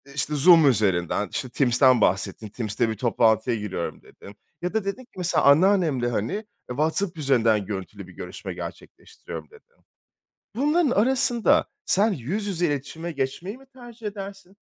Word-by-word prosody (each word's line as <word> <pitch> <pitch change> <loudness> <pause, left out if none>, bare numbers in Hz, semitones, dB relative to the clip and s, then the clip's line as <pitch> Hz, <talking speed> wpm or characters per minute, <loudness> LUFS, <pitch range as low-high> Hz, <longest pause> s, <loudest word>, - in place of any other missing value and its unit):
işte, 150 +1 -1
Zoom 165 +1 +7
üzerinden, 100 -3 +1
işte, 130 - -3
Teams'ten 125 -1 +3
bahsettin, 100 +3 0
Teams'te 110 +1 -2
bir 110 - -2
toplantıya 115 -1 +2
giriyorum, 105 -5 -5
dedim. 100 +1 -15 0.3
Ya 180 +3 -3
da 220 -2 0
dedin 200 +6 -3
ki, 240 - -59
mesela, 180 -1 +1
anneannemle, 155 -5 +4
hani, 110 - -2
eee, 215 +1 -4 0.2
WhatsApp 160 +7 -1
üzerinden 115 -8 +2
görüntülü 95 -2 -7
bir - - -14
görüşme - - -7
gerçekleştiriyorum, - - -9
dedin. 465 +2 -22 0.7
Bunların 295 +3 +2
arasında 245 +1 +3 0.2
sen 205 +3 +2
yüz 185 - -3
yüze 180 -3 0
iletişime 160 +3 -4
geçmeyi 160 - -4
mi 270 - -18
tercih 240 -3 -11
edersin? 195 -2 -8
155 Hz, 145 wpm, -24 LUFS, -, 0.7 s, Zoom